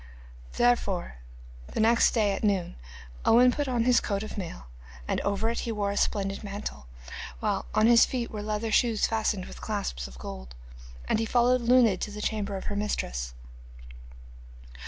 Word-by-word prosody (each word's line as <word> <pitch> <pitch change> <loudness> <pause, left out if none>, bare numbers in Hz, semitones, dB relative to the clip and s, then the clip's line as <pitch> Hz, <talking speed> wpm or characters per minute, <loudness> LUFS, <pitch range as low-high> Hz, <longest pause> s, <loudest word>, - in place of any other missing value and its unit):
Therefore 205 - +1 0.5
the - - -5
next 230 +1 +4
day 210 -3 +3
at 195 - -4
noon 195 -4 0 0.5
Owen 250 +2 +6
put 290 +2 -2
on 245 -3 +1
his 245 0 +4
coat 200 -1 -2
of 215 - -7
mail, 170 - -6 0.4
and - - 0
over 200 +2 0
it 235 - -3
he 235 - -3
wore 205 -2 -1
a - - -3
splendid 195 0 -1
mantle, 200 - -6 0.5
while - - -1
on 215 - +4
his 235 0 +7
feet 245 -3 -2
were 210 - -5
leather 215 +1 -2
shoes 230 -2 +3
fastened 215 -4 -1
with - - -11
clasps - - -3
of 60 -1 -13
gold. 60 0 -8 0.5
And - - +1
he 225 - 0
followed 245 +1 +3
Luned 235 -5 +4
to - - -2
the 210 0 -8
chamber 210 -2 -2
of - - -7
her 205 - -4
mistress. - - -3
210 Hz, 175 wpm, -27 LUFS, 195-235 Hz, 0.5 s, his